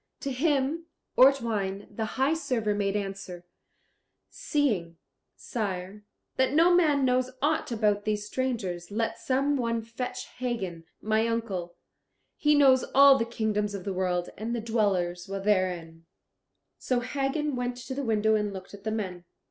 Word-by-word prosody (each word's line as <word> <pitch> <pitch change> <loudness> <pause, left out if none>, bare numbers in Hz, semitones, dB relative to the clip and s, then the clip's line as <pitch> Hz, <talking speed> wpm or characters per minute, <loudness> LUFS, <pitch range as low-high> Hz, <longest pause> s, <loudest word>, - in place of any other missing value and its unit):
To 275 - -3
him 290 +3 0 0.3
Ortwein, 225 -7 +3
the 220 +2 -4
High 270 +4 +3
Server, 255 -10 -1
made 200 -1 -1
answer, 195 -3 -5 0.9
"Seeing, 200 - -1 0.4
sire, 200 -2 -4 0.3
that 260 +1 +2
no 335 +4 +5
man 300 -6 +4
knows 255 0 +2
aught 295 -1 0
about 210 -3 +1
these 210 -1 -1
strangers, 210 -8 -3
let 225 +2 -2
some 275 +2 +1
one 230 -2 -1
fetch 230 +3 -5
Hagen, 195 -10 -3 0.2
my 220 +1 +2
uncle; 195 -7 -3 0.6
he 300 0 +3
knows 265 -3 +6
all 275 0 +8
the 230 - +1
kingdoms 210 -3 -1
of 190 - -6
the 195 - -3
world, 180 -1 -1
and 230 +3 -2
the - - -1
dwellers 195 -6 0
therein." 185 -5 -1 0.7
So 250 -2 0
Hagen 275 +3 -1
went 245 0 -2
to 250 +2 -6
the 280 - -3
window 220 -2 +2
and 210 -1 +1
looked 190 0 -9
at 200 -1 -11
the 220 - -2
men. 185 -5 -4
220 Hz, 150 wpm, -28 LUFS, 195-260 Hz, 0.9 s, all